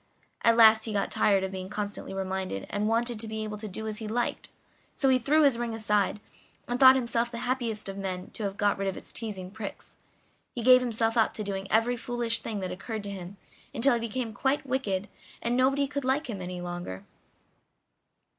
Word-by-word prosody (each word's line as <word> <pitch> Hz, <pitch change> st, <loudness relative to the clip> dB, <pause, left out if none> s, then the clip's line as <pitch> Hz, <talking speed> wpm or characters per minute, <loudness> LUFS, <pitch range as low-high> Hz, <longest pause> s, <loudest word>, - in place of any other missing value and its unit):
At 230 Hz, 0 st, +5 dB
last 220 Hz, -1 st, +7 dB
he 220 Hz, -, -3 dB
got 200 Hz, -, 0 dB
tired 195 Hz, -2 st, +3 dB
of 190 Hz, -, -2 dB
being 185 Hz, -1 st, -6 dB
constantly 205 Hz, 0 st, -4 dB
reminded, 190 Hz, -, -3 dB
and 205 Hz, +1 st, 0 dB
wanted 230 Hz, 0 st, +1 dB
to 225 Hz, -, -2 dB
be 220 Hz, 0 st, -3 dB
able 210 Hz, -1 st, -5 dB
to 215 Hz, -, -5 dB
do 210 Hz, +3 st, -5 dB
as 215 Hz, 0 st, -3 dB
he 220 Hz, -, -5 dB
liked, 240 Hz, +3 st, -2 dB, 0.5 s
so 270 Hz, -, +2 dB
he 260 Hz, -1 st, +4 dB
threw 300 Hz, +6 st, +3 dB
his 270 Hz, -5 st, +4 dB
ring 235 Hz, -2 st, -2 dB
aside, 210 Hz, -2 st, +1 dB, 0.5 s
and 245 Hz, +1 st, -2 dB
thought 260 Hz, 0 st, +9 dB
himself 235 Hz, -2 st, 0 dB
the 235 Hz, -, -7 dB
happiest 240 Hz, -5 st, -1 dB
of 195 Hz, 0 st, -6 dB
men 185 Hz, -2 st, -4 dB
to -, -, -5 dB
have 195 Hz, 0 st, -3 dB
got 205 Hz, -1 st, +1 dB
rid 195 Hz, -, -1 dB
of 190 Hz, -, -2 dB
its -, -, -9 dB
teasing 195 Hz, -5 st, -4 dB
pricks. 210 Hz, -1 st, -8 dB, 0.6 s
He 240 Hz, -, -3 dB
gave 255 Hz, +1 st, +8 dB
himself 230 Hz, -1 st, 0 dB
up 225 Hz, -, +3 dB
to 215 Hz, -, -3 dB
doing 195 Hz, -1 st, -4 dB
every 230 Hz, +3 st, +3 dB
foolish 240 Hz, -1 st, -1 dB
thing 210 Hz, -3 st, -4 dB
that 185 Hz, -, -3 dB
occurred 215 Hz, +3 st, -5 dB
to 200 Hz, -, -3 dB
him, 190 Hz, 0 st, -8 dB, 0.4 s
until 255 Hz, +3 st, +4 dB
he 235 Hz, -, +1 dB
became 230 Hz, 0 st, -3 dB
quite 270 Hz, +6 st, 0 dB
wicked 210 Hz, -7 st, -1 dB, 0.3 s
and 235 Hz, +1 st, -1 dB
nobody 270 Hz, +2 st, +3 dB
could 280 Hz, 0 st, -4 dB
like 265 Hz, +4 st, 0 dB
him 205 Hz, -6 st, -5 dB
any 180 Hz, 0 st, -5 dB
longer. 175 Hz, -, -6 dB
220 Hz, 210 wpm, -28 LUFS, 195-240 Hz, 0.6 s, thought